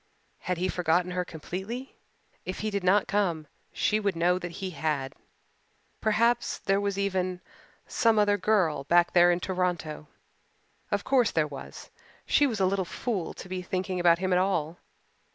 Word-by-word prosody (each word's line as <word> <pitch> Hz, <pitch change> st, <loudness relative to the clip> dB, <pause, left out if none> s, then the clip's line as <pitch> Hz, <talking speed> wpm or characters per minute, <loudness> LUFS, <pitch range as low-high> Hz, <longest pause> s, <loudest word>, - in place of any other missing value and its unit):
Had 180 Hz, -1 st, -2 dB
he 180 Hz, +2 st, 0 dB
forgotten 180 Hz, 0 st, +1 dB
her 180 Hz, 0 st, -1 dB
completely? 190 Hz, +10 st, -6 dB, 0.5 s
If 185 Hz, -, -5 dB
he 215 Hz, 0 st, -2 dB
did 200 Hz, -2 st, -2 dB
not 190 Hz, +3 st, +3 dB
come 180 Hz, -6 st, 0 dB, 0.3 s
she 215 Hz, -, +1 dB
would 200 Hz, -3 st, -1 dB
know 175 Hz, +2 st, +2 dB
that 175 Hz, -1 st, -6 dB
he 190 Hz, 0 st, -5 dB
had. 145 Hz, -4 st, -2 dB, 0.9 s
Perhaps 230 Hz, +3 st, +2 dB
there 195 Hz, +1 st, 0 dB
was 200 Hz, -1 st, -1 dB
even 185 Hz, -2 st, -1 dB, 0.5 s
some 230 Hz, -2 st, +2 dB
other 205 Hz, -1 st, +4 dB
girl 185 Hz, -8 st, +1 dB
back 175 Hz, +2 st, +3 dB
there 175 Hz, 0 st, +6 dB
in 175 Hz, -, +1 dB
Toronto. 175 Hz, -5 st, -2 dB, 0.8 s
Of 205 Hz, -3 st, -1 dB
course 255 Hz, -4 st, +3 dB
there 160 Hz, -2 st, +1 dB
was. 140 Hz, -2 st, -10 dB, 0.3 s
She 290 Hz, -, +4 dB
was 225 Hz, -6 st, -3 dB
a 190 Hz, -, +3 dB
little 190 Hz, +1 st, +1 dB
fool 195 Hz, 0 st, -3 dB
to -, -, -9 dB
be 185 Hz, 0 st, -4 dB
thinking 185 Hz, 0 st, -3 dB
about 170 Hz, -1 st, +5 dB
him 185 Hz, +1 st, 0 dB
at 180 Hz, -, +4 dB
all. 175 Hz, -4 st, -1 dB
185 Hz, 170 wpm, -28 LUFS, 175-200 Hz, 0.9 s, there